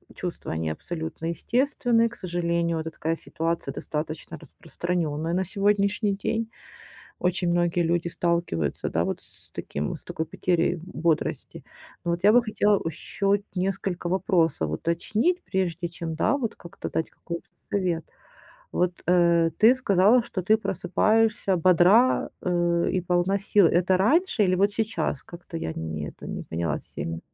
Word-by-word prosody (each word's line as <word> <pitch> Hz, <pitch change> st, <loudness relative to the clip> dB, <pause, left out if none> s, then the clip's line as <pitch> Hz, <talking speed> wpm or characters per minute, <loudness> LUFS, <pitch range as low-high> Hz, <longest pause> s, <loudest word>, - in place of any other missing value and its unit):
чувства, 180 Hz, -2 st, -5 dB
они 80 Hz, 0 st, -2 dB
абсолютно 160 Hz, -, -5 dB
естественны. 240 Hz, +4 st, +1 dB
К 235 Hz, -, -9 dB
сожалению, 170 Hz, -3 st, -1 dB
вот 160 Hz, -, -2 dB
такая 165 Hz, +1 st, -2 dB
ситуация 165 Hz, +1 st, -3 dB
достаточно 155 Hz, +1 st, -5 dB
распространенная 165 Hz, -1 st, -3 dB
на 190 Hz, +1 st, +1 dB
сегодняшний 205 Hz, +1 st, +1 dB
день. 225 Hz, +3 st, -2 dB, 0.7 s
Очень 180 Hz, 0 st, +1 dB
многие 175 Hz, 0 st, +2 dB
люди 170 Hz, +1 st, +1 dB
сталкиваются, 170 Hz, -, -1 dB
да, -, -, 0 dB
вот -, -, -3 dB
с -, -, -16 dB
таким, 75 Hz, +1 st, -4 dB
с -, -, -17 dB
такой 160 Hz, -, -3 dB
потерей 175 Hz, +1 st, 0 dB
бодрости. 165 Hz, -3 st, -2 dB, 0.4 s
Но 170 Hz, -, 0 dB
вот 170 Hz, +3 st, -2 dB
я 210 Hz, -, +7 dB
бы 245 Hz, +1 st, +6 dB
хотела 210 Hz, -2 st, +2 dB
еще 165 Hz, +5 st, -4 dB
вот 200 Hz, 0 st, +4 dB
несколько 185 Hz, -1 st, -2 dB
вопросов 170 Hz, -, +1 dB
уточнить, 215 Hz, -, 0 dB
прежде 175 Hz, -2 st, -1 dB
чем, 165 Hz, -1 st, -5 dB
да, 280 Hz, -, +2 dB
вот 230 Hz, -5 st, -3 dB
как-то 170 Hz, -, -8 dB
дать 160 Hz, -, -2 dB
какой-то 170 Hz, 0 st, -7 dB, 0.2 s
совет. 180 Hz, -5 st, 0 dB, 0.7 s
Вот, 180 Hz, 0 st, -1 dB
э, 170 Hz, -2 st, +4 dB
ты 225 Hz, +4 st, +7 dB
сказала, 220 Hz, -1 st, +4 dB
что 195 Hz, -5 st, -4 dB
ты 215 Hz, +4 st, +4 dB
просыпаешься 200 Hz, +1 st, +1 dB
бодра, 185 Hz, +8 st, +4 dB
э, 175 Hz, -1 st, +1 dB
и 185 Hz, -, +1 dB
полна 180 Hz, +2 st, +1 dB
сил. 200 Hz, -1 st, +4 dB
Это 180 Hz, +3 st, +3 dB
раньше 255 Hz, -, +3 dB
или 185 Hz, -1 st, +2 dB
вот 200 Hz, +3 st, +3 dB
сейчас? 215 Hz, -, -1 dB
Как-то 170 Hz, 0 st, -10 dB
я 80 Hz, -, -3 dB
не 80 Hz, -2 st, -4 dB
это -, -, -11 dB
не -, -, -5 dB
поняла 80 Hz, -2 st, -2 dB
сильно. 80 Hz, 0 st, -6 dB
175 Hz, 150 wpm, -26 LUFS, 165-200 Hz, 0.7 s, я